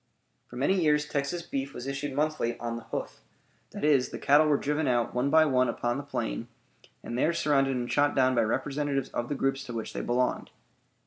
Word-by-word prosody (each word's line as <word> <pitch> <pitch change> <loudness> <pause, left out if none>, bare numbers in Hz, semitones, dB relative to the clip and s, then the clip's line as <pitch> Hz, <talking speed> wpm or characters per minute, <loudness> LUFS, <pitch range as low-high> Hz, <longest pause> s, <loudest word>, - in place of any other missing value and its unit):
For - - -12
many 180 +9 +1
years 150 -2 +3
Texas 150 +4 -2
beef 140 -4 -4
was 125 - -6
issued 140 0 -4
monthly 150 -5 -1
"on 115 0 -3
the 115 - -8
hoof"; - - -5 0.5
that - - -8
is, 145 -4 +3
the - - -6
cattle 150 +2 +4
were 145 -2 +3
driven 150 +2 -1
out 120 -2 +1
one 125 +3 +1
by 160 +1 +6
one 130 -4 +2
upon 120 +1 -1
the 145 - -4
plain, - - -3 0.6
and 120 - -5
there 155 +7 +2
surrounded 135 -4 +2
and 120 -1 -3
shot 145 0 +2
down 130 -1 +3
by 120 - +3
representatives 140 +4 -1
of 120 - -3
the 145 - -1
groups 135 0 -1
to 120 - -7
which 110 - -5
they - - -3
belonged. 125 +1 0
135 Hz, 210 wpm, -28 LUFS, 125-145 Hz, 0.6 s, by